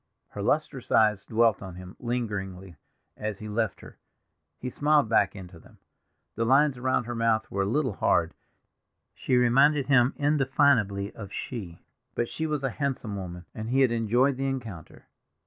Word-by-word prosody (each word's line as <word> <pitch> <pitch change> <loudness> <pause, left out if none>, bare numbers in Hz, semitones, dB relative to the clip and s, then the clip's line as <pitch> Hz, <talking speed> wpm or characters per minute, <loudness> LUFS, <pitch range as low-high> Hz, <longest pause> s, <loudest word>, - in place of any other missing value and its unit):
Her - - -7
lustrous - - -1
eyes 105 -3 +3
dwelt 115 -1 +2
on 95 -3 -8
him 90 +1 -10
lingeringly 95 -7 -4 0.4
as 110 -2 -4
he 110 - -8
left 110 -1 -2
her; - - -14 0.6
he 125 - -5
smiled 150 -2 +3
back 105 -3 +2
into 90 -3 -10
them. - - -19 0.6
The 115 - -1
lines 135 +4 +4
around 125 0 0
her 120 +1 -5
mouth 115 -1 0
were 100 - -1
a - - +1
little 130 +1 0
hard; - - +1 0.8
she 130 - -1
reminded 135 +4 +4
him 130 -2 +3
indefinably 135 -8 +2
of 100 -3 -9
"She"; 95 -10 -6 0.3
but 120 - 0
she 160 - -3
was 150 -2 -2
a 135 - 0
handsome 130 -7 -3
woman, 90 -2 -7
and 110 0 -6
he 135 +2 +2
had 130 -3 +4
enjoyed 120 +4 +2
the 135 0 -1
encounter. 115 - -6
115 Hz, 165 wpm, -27 LUFS, 100-135 Hz, 0.8 s, lines